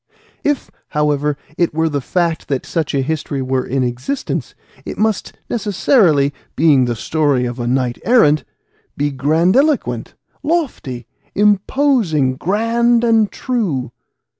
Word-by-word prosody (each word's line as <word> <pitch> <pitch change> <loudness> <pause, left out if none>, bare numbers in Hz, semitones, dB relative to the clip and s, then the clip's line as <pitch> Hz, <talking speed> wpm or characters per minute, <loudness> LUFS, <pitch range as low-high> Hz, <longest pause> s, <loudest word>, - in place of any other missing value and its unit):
If, 290 -2 -1 0.2
however, 150 -1 0 0.2
it 170 -3 +1
were 160 0 +2
the 145 -3 -1
fact 170 +3 -1
that 135 -2 -2
such 155 -3 -2
a 135 - +1
history 150 -1 -3
were 130 0 0
in 130 +1 -1
existence, 125 - -3 0.3
it - - -7
must 215 -2 0
necessarily, 195 - +2 0.2
being 145 -4 +4
the 120 -1 -1
story 145 +1 +1
of 120 +1 -4
a 120 - -2
knight 125 -1 0
errant, 155 -12 +4 0.5
be 145 +1 0
grandiloquent, 170 - +1 0.3
lofty, 265 - -2 0.3
imposing, 205 - +2
grand 230 - +1
and 225 -3 +3
true. 180 - -2
155 Hz, 125 wpm, -18 LUFS, 135-220 Hz, 0.5 s, being